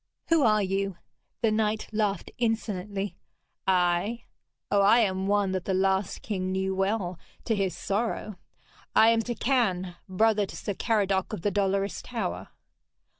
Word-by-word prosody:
Who 330 -2 +4
are 215 -4 +4
you?' 195 -1 -1 0.5
The 225 - +4
knight 215 0 0
laughed 210 -4 -1
insolently. 205 -4 -2 0.5
'I? 180 +5 +2 0.5
Oh, 205 -1 +4
I 215 +4 +6
am 190 -2 0
one 200 -1 +2
that 185 -2 -2
the 190 - 0
last 190 0 0
king 185 -3 -2
knew 190 0 0
well 190 -2 -1 0.3
to 225 - +1
his 195 -3 -1
sorrow. 210 -2 -2 0.6
I 220 - +7
am 230 0 +3
Turquine, 225 -7 0
brother 210 +1 +2
to - - -9
Sir 205 - -3
Caradoc 195 -3 0
of 165 - -5
the 205 - +1
Dolorous 195 0 0
Tower.' - - -4
200 Hz, 145 wpm, -27 LUFS, 190-220 Hz, 0.6 s, I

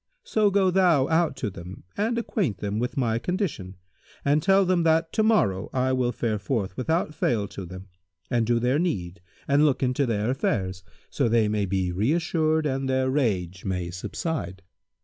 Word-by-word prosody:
So 215 - +2
go 195 -2 +3
thou 175 -7 +4
out 160 -2 +2
to 125 -6 -3
them 90 +1 -10
and 225 +3 0
acquaint 195 - -1
them 100 +2 -3
with 125 +5 -3
my 115 -3 +1
condition 160 - -3 0.5
and 145 +2 +3
tell 195 +3 +4
them 180 -1 +2
that 165 0 +2
to 220 - +2
morrow 205 - +2
I 130 0 +1
will 125 -1 +1
fare 110 -4 -2
forth 105 -4 -2
without 160 +3 -1
fail 110 -8 0
to 95 -3 -7
them 95 +2 -10 0.4
and 115 -2 0
do 120 0 +3
their 125 +5 +1
need 95 - -2 0.3
and 140 +2 +4
look 145 -3 +2
into 130 +2 +1
their 110 +1 0
affairs, 95 -8 -1 0.3
so 135 -5 +1
they 115 -1 +3
may 105 -1 0
be 95 -1 -1
reassured 155 - +1
and 135 -1 -1
their 130 0 +1
rage 95 - -1
may 90 -3 -3
subside.' 95 - -4
130 Hz, 180 wpm, -25 LUFS, 100-160 Hz, 0.5 s, thou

